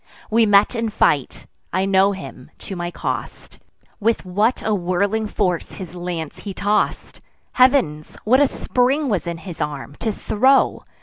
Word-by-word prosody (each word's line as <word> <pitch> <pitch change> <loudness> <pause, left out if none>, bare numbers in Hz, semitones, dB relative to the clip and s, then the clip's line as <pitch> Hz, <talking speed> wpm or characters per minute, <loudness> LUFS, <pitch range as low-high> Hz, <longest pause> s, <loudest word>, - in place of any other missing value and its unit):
We 225 0 +4
met 200 +2 +5
in 230 -2 -1
fight; 215 - 0 0.3
I 190 - 0
know 195 0 +4
him, 190 -9 -9
to 195 - -7
my 175 -1 -3
cost: - - -5 0.4
With 225 -1 0
what 210 +7 0
a 215 - +1
whirling 200 +4 0
force 180 -5 -1
his 180 -3 -8
lance 175 -3 -5
he 200 -2 -7
toss'd! 205 +1 -1 0.3
Heav'ns! 250 - +2
what 250 +5 +4
a 285 - +5
spring 265 +4 0
was 185 -7 -1
in 170 -1 -3
his 170 -1 -8
arm, 145 -1 -4
to 225 - -1
throw! 260 +6 +2
200 Hz, 160 wpm, -21 LUFS, 175-225 Hz, 0.4 s, met